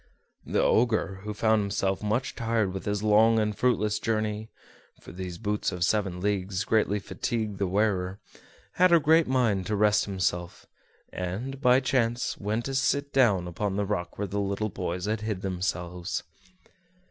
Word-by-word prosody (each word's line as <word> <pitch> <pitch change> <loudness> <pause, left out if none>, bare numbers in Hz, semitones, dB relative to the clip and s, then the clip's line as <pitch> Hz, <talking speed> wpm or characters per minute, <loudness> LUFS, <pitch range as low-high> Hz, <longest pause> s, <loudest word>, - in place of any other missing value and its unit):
The - - +1
Ogre, 110 -5 +2
who 105 - -3
found 110 0 +3
himself 100 -1 -1
much 110 +5 -1
tired 115 -5 0
with 95 - -6
his 105 0 -1
long 110 +2 +5
and 105 -1 0
fruitless 105 -3 +1
journey 110 -1 -2 0.5
(for - - -12
these 90 0 -6
boots 105 0 -1
of 90 -1 -2
seven 95 -1 0
leagues 95 -1 -1
greatly 105 -2 +1
fatigued 105 0 -3
the 100 - +1
wearer), 95 -1 0 0.6
had 185 0 +5
a 170 - +7
great 160 +2 +4
mind 115 -8 +1
to 105 - 0
rest 105 0 +3
himself, 90 -3 -2 0.5
and, 110 +10 -4
by 125 -1 +5
chance, 120 -2 0
went 110 +3 -2
to 135 - -3
sit 140 +2 0
down 105 -10 +3
upon 95 +3 -2
the 100 0 0
rock 90 -4 -3
where 100 - -2
the 100 +1 -3
little 100 +2 -1
boys 90 0 -4
had 105 +1 -1
hid 110 -3 -3
themselves. 90 -1 -3
105 Hz, 165 wpm, -27 LUFS, 95-115 Hz, 0.6 s, a